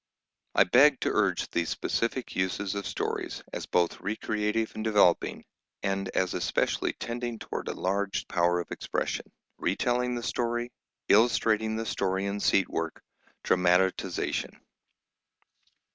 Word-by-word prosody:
I - - +7
beg 135 +7 +5
to - - +1
urge 100 -4 +1
these 85 -1 0
specific 120 +2 -2
uses 95 +1 -1
of 100 0 -3
stories, - - -3
as - - -4
both 85 -1 +1
recreative 105 +2 -1
and 110 - -5
developing, 105 -5 +3 0.4
and 95 0 -1
as 95 -1 +1
especially - - 0
tending 120 0 -4
toward - - -5
enlarged 100 +2 -1
power 90 0 +2
of 85 - -6
expression: - - -3 0.3
retelling 125 0 0
the 120 - -4
story; 120 +1 -1 0.4
illustrating 110 0 +3
the 115 0 -3
story 95 -2 -1
in 100 +1 -2
seat 100 -1 +3
work; 80 -1 -4 0.4
dramatisation. 90 +1 +1
105 Hz, 125 wpm, -28 LUFS, 95-115 Hz, 0.4 s, I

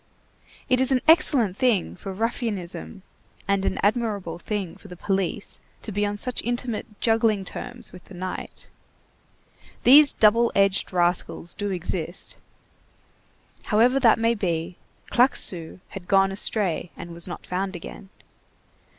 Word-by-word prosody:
It 255 -1 +3
is 260 - +1
an 255 -1 +3
excellent 285 - +4
thing 235 -8 +1
for 195 +2 -7
ruffianism 205 -3 -4 0.4
and 200 -1 +1
an - - 0
admirable 205 -6 0
thing 195 -2 -4
for - - -15
the 180 -2 -10
police 195 +2 -2 0.2
to 220 - -4
be 205 +1 0
on 205 0 -3
such 250 +3 -3
intimate 240 -3 -3
juggling 225 -3 +2
terms 245 +4 -7
with 180 - -13
the 195 - -13
night. 185 +1 -7 1.1
These 280 +3 +7
double 230 +2 +4
edged 195 0 +2
rascals 175 -1 0
do 205 0 -3
exist. 180 -2 -4 1.3
However 240 +5 +3
that 235 -4 +5
may 230 +1 +2
be, 175 -4 -2 0.4
Claquesous 185 -10 +2
had 185 -3 -9
gone 195 0 +4
astray 195 -3 -1
and 170 - -8
was 170 +1 -2
not 175 - -7
found 190 +1 -3
again. 185 +3 -9
200 Hz, 135 wpm, -24 LUFS, 185-230 Hz, 1.3 s, These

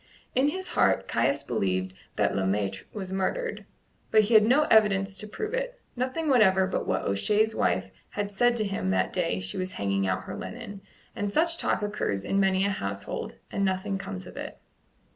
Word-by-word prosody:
In 260 +3 +3
his 375 +5 -2
heart - - +2
Caius 140 +1 +1
believed 95 -7 -1 0.2
that - - +1
Le 95 - +1
Maître 95 0 -1
was 190 -3 -6
murdered; 455 - -2 0.4
but 215 - +6
he 215 +2 0
had 215 -1 +8
no 275 +6 +5
evidence 200 -6 +3
to 215 - -4
prove 425 - -5
it - - -3 0.2
nothing 260 +6 -2
whatever 190 -8 +5
but 185 - -2
what - - 0
O'Shea's 210 - +2
wife - - 0 0.2
had 205 0 -3
said 240 +4 +3
to 215 - +1
him 195 - -2
that 95 0 +1
day 90 - 0
she 95 +1 -5
was 185 0 -2
hanging 100 -1 0
out 95 0 -1
her - - -6
linen, 215 -4 -7 0.3
and 205 0 -2
such 335 +7 +2
talk - - 0
occurs 205 - -2
in 195 - +1
many 190 0 +3
a 200 - +1
household, 100 - -4 0.2
and 200 - -1
nothing 195 +1 0
comes 95 - -6
of - - -11
it. - - -6
195 Hz, 195 wpm, -27 LUFS, -, 0.4 s, had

